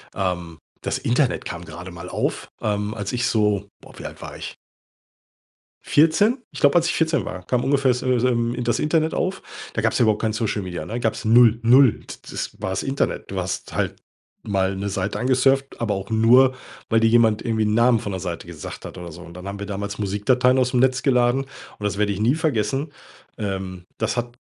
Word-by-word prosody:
ähm, 90 -4 -3 0.2
das - - -2
Internet 125 +2 0
kam 85 0 -6
gerade 85 +3 -9
mal 85 +1 -9
auf, - - -2
ähm, 105 0 -1
als 105 -1 -4
ich 125 0 0
so 105 -3 +1
boah, - - -15
wie - - -9
alt - - -8
war - - -8
ich? - - -7 1.3
14? 185 - +3
Ich - - -7
glaube, 145 +2 +5
als 170 -1 +4
ich - - +1
14 160 0 +1
war, 90 0 -7
kam 125 -1 0
ungefähr 135 -2 +3
so 125 0 0
so, 125 +2 +2
ähm, 120 0 0
das 120 - +1
Internet 155 +1 +1
auf. 190 +1 -2 0.3
Da 110 - -1
gab's 110 - +1
ja - - +4
überhaupt 110 -1 +2
kein 110 -1 +1
Social 110 -2 -1
Media, 90 -4 -5
ne? 120 +2 -4
Gab's 115 -2 -1
0. 115 0 +6
0. 125 +1 +5
T - - -9
das - - -5
war 95 - -2
das 95 - -2
Internet, 135 +1 -2
du 100 - -3
hast 90 0 -4
halt - - -1 0.5
mal 95 -1 0
'ne 100 +1 -3
Seite 95 -1 -2
angesurft, 135 +2 +1
aber 110 -3 0
auch 95 +1 -6
nur, 125 +4 +5 0.3
weil 115 -1 +3
dir 115 - +4
jemand 115 -2 +4
irgendwie 110 -2 0
'n 105 0 +1
Namen 120 +1 +4
von 100 - -5
'ner 95 - -4
Seite 85 -2 -5
gesagt 85 -4 -8
hat - - -8
oder 85 -2 -8
so, 85 +3 -11
und 85 0 -12
dann 90 +1 -9
haben 100 +1 -5
wir 100 - -5
damals 100 0 -4
Musikdateien 125 +6 +2
ausm 125 0 +2
Netz 130 0 +2
geladen 125 0 +3
und 135 -5 -13
das 100 -1 -1
werde 105 -1 +2
ich 100 - -5
nie 120 +5 +3
vergessen. 145 -2 -1 0.4
Ähm, 95 -3 -4
das 110 +2 -1
hat 120 0 -3
110 Hz, 215 wpm, -22 LUFS, 100-125 Hz, 1.3 s, 0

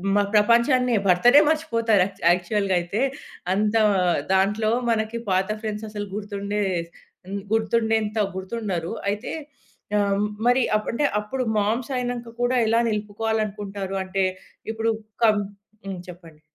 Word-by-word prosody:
మ 205 - +4
ప్రపంచాన్నే 235 +3 +4
భర్తడే 240 +11 +6
మర్చిపోతారు. 230 - +2
యాక్ 195 0 -10
యాక్చువల్‌గా 190 +2 +1
అయితే 185 +7 -3 0.5
అంత 210 +2 +1 0.6
దాంట్లో 210 +3 +2 0.2
మనకి 220 +1 -1
పాత 190 +2 +1
ఫ్రెండ్స్ 215 0 -4
అసలు 205 -1 -5
గుర్తుండే 205 0 -3 0.7
హ్మ్. 200 +1 -4
గుర్తుండేంత 220 -1 +1 0.2
గుర్తుండరు. 190 -4 -3 0.2
అయితే 210 +4 -4 0.6
ఆహ్, 200 -1 +2 0.3
మరి 250 0 +4
అప్ 215 - -7
అంటే 290 +5 +1 0.2
అప్పుడు 255 +5 -3 0.2
మామ్స్ 230 +6 -1
అయినక 240 -2 -4
గూడా 245 +1 +1
ఎలా 230 +1 +3
నిలుపుకోవాలనుకుంటారు 210 -2 -3
అంటే 190 0 0 0.5
ఇప్పుడు 225 +1 -1 0.3
కం 215 -2 +5 0.5
హ్మ్. 190 -2 -5
చెప్పండి. 165 -3 -13
210 Hz, 120 wpm, -24 LUFS, 200-230 Hz, 0.7 s, భర్తడే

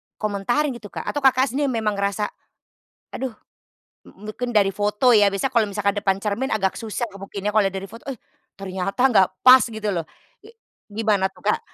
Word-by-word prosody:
komentarin 215 +8 -1
gitu, 235 -4 -9
Kak - - -7
atau 290 - -3
Kakak 265 -1 +3
sendiri 285 +3 0
memang 220 -5 -1
ngerasa, 200 +1 -1 0.8
aduh 260 -3 -4 0.7
mu 210 +2 -11
mungkin 245 +2 -4
dari 195 -2 +4
foto 210 +5 +2
ya, 210 -3 +6
biasanya 200 +7 -2
kalau 225 -3 +2
misalkan 200 0 0
depan 195 -1 +1
cermin 215 +6 -1
agak 190 -2 0
susah 225 +1 -3
ngebuktiinnya, 195 +1 -5
kalau 210 -2 +3
dari 195 0 -6
foto 230 +6 -12
eh, 270 - -4 0.4
ternyata 195 +3 -4
enggak 220 -8 +5 0.2
pas 255 +1 +9
gitu 220 -1 -5
loh. 170 -3 -2 0.4
I 420 - -16 0.4
gimana 210 -2 +1
tuh, 190 - -22
Kak? - - +1
210 Hz, 180 wpm, -22 LUFS, 195-245 Hz, 0.8 s, pas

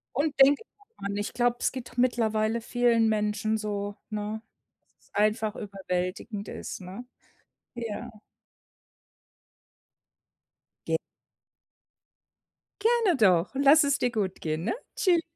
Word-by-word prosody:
Und 285 0 0
denk 275 +1 +7
immer 415 -2 -21 0.2
dran, 200 - -3
ich 205 - -3
glaub, 245 0 +1
es - - 0
geht 250 -1 -8
mittlerweile 225 -2 +1
vielen 230 -1 +3
Menschen 215 +1 0
so, 205 -1 -3
ne, 215 +1 -3 0.5
dass - - -29
es - - -49
einfach 215 +1 +1
überwältigend 195 +1 -4
ist, - - -6
ne? 190 +6 -8 0.7
Ja. 235 0 -5 2.8
Ge - - +2 1.8
Gerne 450 -6 +3
doch. 185 -5 +4
Lass 280 +3 +6
es 280 -1 +1
dir 245 - +1
gut 205 -5 -2
gehen, 160 +2 -2
ne? - - +1 0.2
Tschüss. 350 -4 +3
220 Hz, 115 wpm, -28 LUFS, 205-255 Hz, 2.8 s, denk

